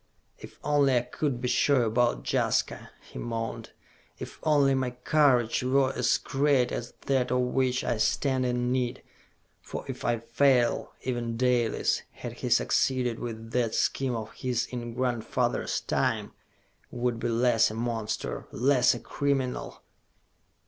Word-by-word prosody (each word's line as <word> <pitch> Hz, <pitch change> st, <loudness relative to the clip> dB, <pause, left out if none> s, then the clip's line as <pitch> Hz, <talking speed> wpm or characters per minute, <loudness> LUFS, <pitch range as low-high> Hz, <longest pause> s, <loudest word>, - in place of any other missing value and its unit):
"If -, -, -12 dB
only 140 Hz, -3 st, +3 dB
I -, -, +3 dB
could 125 Hz, +1 st, -3 dB
be 125 Hz, -, -1 dB
sure 130 Hz, +1 st, +3 dB
about 115 Hz, -, +1 dB
Jaska!" -, -, 0 dB, 0.2 s
he -, -, -7 dB
moaned. 115 Hz, -1 st, -4 dB, 0.5 s
"If -, -, -9 dB
only 145 Hz, -3 st, +3 dB
my 130 Hz, -1 st, 0 dB
courage 125 Hz, -2 st, +2 dB
were 130 Hz, +1 st, +2 dB
as 120 Hz, -1 st, +2 dB
great 140 Hz, -2 st, +1 dB
as 120 Hz, -, -5 dB
that 130 Hz, -2 st, +1 dB
of 125 Hz, -, +1 dB
which 125 Hz, 0 st, +1 dB
I 120 Hz, -, -1 dB
stand 130 Hz, +3 st, +1 dB
in 125 Hz, 0 st, 0 dB
need! 125 Hz, 0 st, -1 dB, 0.6 s
For -, -, -7 dB
if -, -, -6 dB
I 120 Hz, -1 st, +1 dB
fail, 120 Hz, +1 st, +2 dB
even 120 Hz, -2 st, -2 dB
Dalis, 125 Hz, -2 st, +1 dB
had -, -, -7 dB
he -, -, -5 dB
succeeded 125 Hz, -3 st, +1 dB
with 115 Hz, -1 st, -6 dB
that 120 Hz, -3 st, 0 dB
scheme 130 Hz, -3 st, 0 dB
of 110 Hz, -1 st, -5 dB
his 125 Hz, -2 st, -1 dB
in 120 Hz, -2 st, -5 dB
grandfather's 125 Hz, -3 st, -1 dB
time, -, -, -1 dB, 0.6 s
would 120 Hz, -1 st, -2 dB
be -, -, -1 dB
less 115 Hz, -1 st, +3 dB
a 110 Hz, -, -7 dB
monster, 115 Hz, -2 st, -3 dB
less 130 Hz, 0 st, +3 dB
a -, -, -6 dB
criminal!" 135 Hz, -3 st, -2 dB
125 Hz, 145 wpm, -28 LUFS, 120-130 Hz, 0.6 s, only